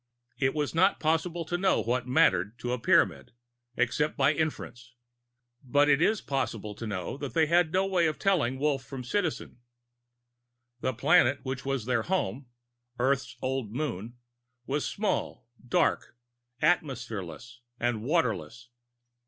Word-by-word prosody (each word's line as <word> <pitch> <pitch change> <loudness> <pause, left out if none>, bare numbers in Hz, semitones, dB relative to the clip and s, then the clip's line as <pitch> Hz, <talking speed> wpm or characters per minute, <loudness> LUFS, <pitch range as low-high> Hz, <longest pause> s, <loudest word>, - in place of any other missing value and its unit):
It 135 +1 +1
is 150 -2 -1
not 185 +4 +3
possible 165 +2 0
to 175 +2 -2
know 190 0 +3
what 120 +1 -1
"mattered" 100 -3 +3
to 125 - -4
a 125 - -2
Pyramid - - +2 0.4
except 125 +5 0
by 140 +2 +4
inference. 125 -6 -4 0.7
But 145 +3 +3
it 140 +2 +4
is 215 +4 +2
possible 110 -6 -3
to 115 +2 -7
know 100 +4 -4
that 140 -2 -6
they 160 -1 +4
had 170 +1 +3
no 190 +2 +2
way 180 -4 +2
of 155 - -2
telling 150 -10 +1
Wolf 140 -1 0
from 130 -2 -7
Citizen. 160 -2 -2 1.2
The 130 0 -2
planet 140 0 +4
which 130 0 -4
was 135 -5 -2
their 120 -2 +1
home 145 -6 -2 0.5
Earth's 135 +2 0
old 130 -5 -2
Moon 120 -5 -4 0.5
was 140 +3 -1
small, 205 - -2 0.2
dark, 120 - +1 0.5
atmosphereless 120 - -1 0.2
and 120 -2 0
waterless. 120 - -1
135 Hz, 140 wpm, -28 LUFS, 120-160 Hz, 1.2 s, by